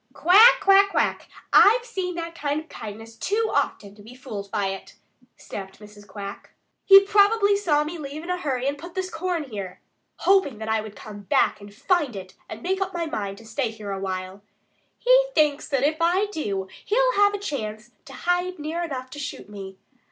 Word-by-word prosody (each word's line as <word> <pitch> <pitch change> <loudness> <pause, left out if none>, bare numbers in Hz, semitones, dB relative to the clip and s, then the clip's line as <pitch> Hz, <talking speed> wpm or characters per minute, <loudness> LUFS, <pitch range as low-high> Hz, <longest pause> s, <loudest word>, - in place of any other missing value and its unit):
"Quack, 415 +8 +7
quack, 395 0 +6
quack! - - -1 0.3
I've 470 +4 +6
seen 360 -6 -4
that 335 -1 -5
kind 290 -2 -2
of 315 - -17
kindness 225 +1 -9
too 440 +3 -1
often 200 -1 -1
to 205 - -16
be 225 +4 -13
fooled 205 -6 -7
by 200 -2 -1
it," 195 0 -8 0.4
snapped 195 -1 -9
Mrs. 210 -1 -14
Quack. 200 0 -9 0.3
"He 390 0 +9
probably 405 +1 +4
saw 320 -7 +1
me 325 +3 -6
leave 295 +2 -7
in 355 - -4
a 360 - -1
hurry 265 -5 -2
and 285 +1 -2
put 345 +4 -10
this 375 -1 -3
corn 340 0 -2
here, 200 -8 -7 0.4
hoping 380 - +2
that 220 0 -7
I 220 0 +1
would 215 -1 -10
come 210 -1 -10
back 195 - +2
and 205 0 -11
find 295 - 0
it 185 -1 -8 0.2
and - - -8
make 380 +2 -1
up 385 -1 -2
my 340 -1 -1
mind 200 -10 -4
to 225 - -14
stay 235 +2 -2
here 215 -2 -8
a 195 - -3
while. 185 0 -5 0.6
He - - +4
thinks 300 -2 +2
that 275 -3 0
if 305 +2 +2
I 360 +4 +3
do, 200 - -3 0.2
he'll - - +2
have 410 0 +4
a - - -2
chance 225 - -5
to 275 - -12
hide 355 +6 -1
near 315 +3 -4
enough 260 -6 -5
to 290 - -8
shoot 285 - -6
me. 195 -2 -9
290 Hz, 205 wpm, -24 LUFS, -, 0.6 s, He